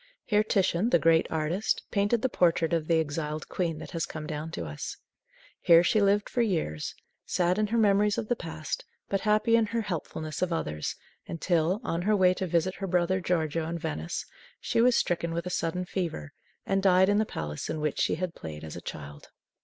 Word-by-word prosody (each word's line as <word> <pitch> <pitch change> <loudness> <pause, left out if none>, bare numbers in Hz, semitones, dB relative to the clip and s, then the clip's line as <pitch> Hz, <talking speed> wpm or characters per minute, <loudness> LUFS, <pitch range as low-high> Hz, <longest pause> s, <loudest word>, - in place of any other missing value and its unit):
Here 210 -1 +3
Titian, 195 0 +1
the 170 - +5
great 165 0 +4
artist, 160 +6 -1
painted 205 +3 +1
the - - +4
portrait 170 -7 +2
of 160 -2 0
the 165 -1 +3
exiled 155 0 -3
queen 170 -4 -2
that 155 -2 -9
has 165 -2 -2
come 155 -1 -6
down 150 +1 -4
to 85 - -5
us. 75 -1 -6 0.6
Here 170 -1 +7
she 215 +4 +3
lived 200 +1 +3
for 245 - 0
years, 160 - -1 0.3
sad 180 +2 +1
in 215 - +2
her 230 +3 0
memories 205 -1 +3
of 215 - -2
the 245 - +1
past, 160 -6 -5 0.3
but 195 - 0
happy 215 +2 +3
in 225 -1 +3
her 230 +2 -1
helpfulness 160 -5 -4
of 185 -1 +1
others 75 - -2 0.3
until, 170 +2 +1
on 170 -6 -1
her 210 +4 +2
way 185 -2 +5
to 185 0 -3
visit 170 +2 +1
her 195 - -4
brother 180 +1 +1
Giorgio 165 -2 0
in 170 - -3
Venice, 80 - -4 0.3
she 230 - +1
was 245 0 +5
stricken 170 -1 0
with 170 0 -2
a 180 - -4
sudden 180 +1 -1
fever, 170 - -4 0.3
and 195 0 +1
died 190 -1 +5
in 205 +1 +3
the - - +4
palace 75 - -5
in 155 - -2
which 150 -1 -1
she - - +2
had 180 +1 -3
played 75 -1 -8
as 80 - -7
a - - -7
child. 75 0 -8
175 Hz, 210 wpm, -28 LUFS, 155-200 Hz, 0.6 s, Here